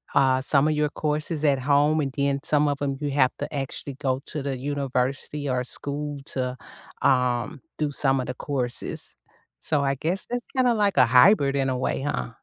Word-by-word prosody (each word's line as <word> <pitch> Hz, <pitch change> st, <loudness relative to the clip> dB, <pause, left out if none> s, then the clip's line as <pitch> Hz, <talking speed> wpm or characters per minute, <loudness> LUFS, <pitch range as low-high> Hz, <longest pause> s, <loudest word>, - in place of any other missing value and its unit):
u -, -, +6 dB
uh, 130 Hz, -1 st, +3 dB
some 140 Hz, 0 st, +5 dB
of -, -, +2 dB
your 150 Hz, -, +2 dB
courses 155 Hz, +1 st, -1 dB
at 135 Hz, -, -2 dB
home, 145 Hz, +2 st, +4 dB
and 135 Hz, -, -3 dB
then 140 Hz, 0 st, +2 dB, 0.2 s
some 150 Hz, 0 st, +4 dB
of 140 Hz, -, -3 dB
‘em 140 Hz, -1 st, 0 dB
you 145 Hz, -, -1 dB
have 130 Hz, -, +4 dB
to -, -, 0 dB, 0.2 s
actually 135 Hz, 0 st, -8 dB
go 130 Hz, -, +4 dB, 0.2 s
to 155 Hz, -, -5 dB
the 135 Hz, -, -1 dB, 0.2 s
university 135 Hz, +1 st, -2 dB
or 125 Hz, -, 0 dB
school 145 Hz, +1 st, -4 dB, 0.2 s
to, 130 Hz, -, 0 dB, 0.7 s
um, 125 Hz, -1 st, 0 dB, 0.2 s
do 150 Hz, -, +2 dB, 0.2 s
some 135 Hz, 0 st, +3 dB
of -, -, -4 dB
the -, -, -2 dB
courses. 125 Hz, -4 st, -2 dB, 0.7 s
So, 155 Hz, -, +1 dB, 0.2 s
I -, -, -2 dB
guess 180 Hz, +4 st, 0 dB
that's 245 Hz, -1 st, -3 dB
kinda 250 Hz, -2 st, +3 dB
like 200 Hz, -7 st, +1 dB
a 125 Hz, -, +7 dB
hybrid 140 Hz, -5 st, +6 dB
in 135 Hz, -, 0 dB
a 130 Hz, -, -1 dB
way, -, -, 0 dB
huh? -, -, -2 dB
140 Hz, 205 wpm, -25 LUFS, 130-150 Hz, 0.7 s, a